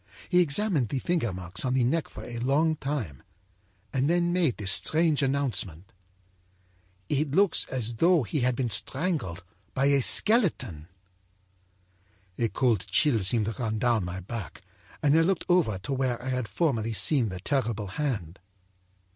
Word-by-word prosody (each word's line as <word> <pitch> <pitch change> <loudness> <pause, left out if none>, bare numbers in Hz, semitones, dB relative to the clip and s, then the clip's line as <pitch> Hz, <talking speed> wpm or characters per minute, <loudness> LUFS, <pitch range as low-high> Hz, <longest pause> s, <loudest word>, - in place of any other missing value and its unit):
He 180 - +4
examined 165 - +1
the 135 - -2
finger 160 - -1
marks 90 0 -6
on 130 -1 0
the 130 - +2
neck 155 +7 0
for - - -10
a 120 -1 -7
long 150 +6 +1
time 130 - -4 0.7
and 135 +2 +1
then 175 0 +1
made 170 -9 +1
this 95 -3 +2
strange 155 - +3
announcement: 110 - -1 1.1
â'It 145 +3 -1
looks 200 -3 +3
as 120 -3 -4
though 170 +1 +3
he 145 +6 -3
had 125 0 +1
been 120 -2 -2
strangled 125 - -1 0.3
by 135 - +1
a 140 -1 +3
skeleton.' 130 - +3 1.5
âA 115 -2 0
cold 120 -7 0
chill 145 -7 +3
seemed 105 +3 0
to 110 - -2
run 110 -2 -2
down 115 -2 +1
my 90 +1 -5
back, 100 0 -8 0.4
and 145 0 +4
I 165 - +5
looked 185 +2 0
over 170 - +2
to 130 +9 -5
where 130 -2 -1
I 130 +2 -6
had 125 -3 -2
formerly 115 - -1
seen 115 - +2
the 95 -1 -6
terrible 115 -2 -1
hand. 100 - -4
130 Hz, 160 wpm, -27 LUFS, 105-150 Hz, 1.5 s, I